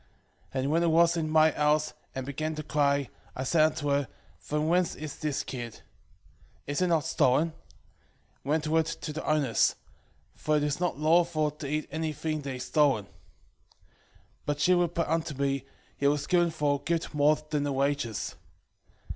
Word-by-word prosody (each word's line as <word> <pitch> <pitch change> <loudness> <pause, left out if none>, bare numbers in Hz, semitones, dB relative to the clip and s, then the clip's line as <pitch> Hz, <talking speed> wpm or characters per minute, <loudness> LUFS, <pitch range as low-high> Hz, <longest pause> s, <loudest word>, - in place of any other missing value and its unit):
2:13 - - +1
And 135 +2 -1
when 165 +2 +3
it 170 - +2
was 170 +1 +4
in 160 -2 -1
my 155 0 +5
house, 150 +1 +1 0.2
and 130 -1 -3
began 155 +3 -3
to 155 - -5
cry, 140 -2 +1 0.3
I 130 - -3
said 155 +4 +2
unto 155 -2 -3
her, 140 -1 +1 0.3
From 150 +1 -2
whence 175 +1 +2
is 150 -2 -7
this 150 -3 -2
kid? 120 -3 -7 0.8
is 145 +4 -2
it 180 - +3
not 165 -4 +2
stolen? 150 +6 +2 0.9
render 155 +2 +1
it 160 - 0
to 155 -1 -5
the 155 - -5
owners; 145 -6 +2 0.6
for 155 0 0
it 145 - 0
is 150 +1 -1
not 180 -4 -1
lawful 155 0 +3
to 150 -1 -7
eat 155 +1 -1
any 160 0 -2
thing 155 +1 -3
that 135 -2 -5
is 125 - -5
stolen. 140 -9 +2
2:14 - - -25 1.4
But 145 0 -1
she 180 - +4
replied 175 -1 +1 0.2
upon 150 -3 -7
me, 140 -1 -1 0.3
It 140 - +3
was 145 0 +1
given 175 -2 +3
for 150 -3 0
a - - -25
gift 165 -1 -1
more 150 +1 +4 0.2
than 150 -2 +1
the 145 0 -1
wages. 135 -5 -1
150 Hz, 180 wpm, -28 LUFS, 140-160 Hz, 1.4 s, my